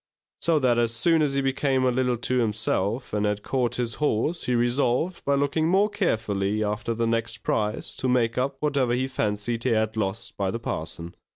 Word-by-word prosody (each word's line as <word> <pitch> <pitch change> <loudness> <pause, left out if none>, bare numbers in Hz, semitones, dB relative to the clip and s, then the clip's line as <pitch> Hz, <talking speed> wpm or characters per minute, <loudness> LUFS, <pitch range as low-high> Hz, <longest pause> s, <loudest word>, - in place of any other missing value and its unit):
So 165 -2 +3
that 125 -4 +2
as 115 -1 +1
soon 160 +7 +3
as 140 -2 +1
he 135 -1 +1
came 135 -1 +1
a 125 - +3
little 125 -1 +1
to 125 +2 0
himself, 110 +1 -1
and 105 -1 0
had 105 0 -1
caught 125 -3 0
his 120 -2 -1
horse, 150 +4 0
he 125 - +1
resolved, 125 +8 +1
by 140 - +3
looking 145 +3 +1
more 195 +4 +3
carefully 110 - 0
after 105 +2 -2
the 115 +1 0
next 115 0 -1
prize, 105 0 -1
to 130 - 0
make 120 -2 +2
up 135 +2 -1
what 150 -1 0
he 125 -1 +1
fancied 115 -2 -2
he 130 - +1
had 110 -1 +1
lost 105 +1 -3
by 100 -1 0
the 115 - -2
parson. 85 -5 -5
120 Hz, 200 wpm, -25 LUFS, 110-135 Hz, -, So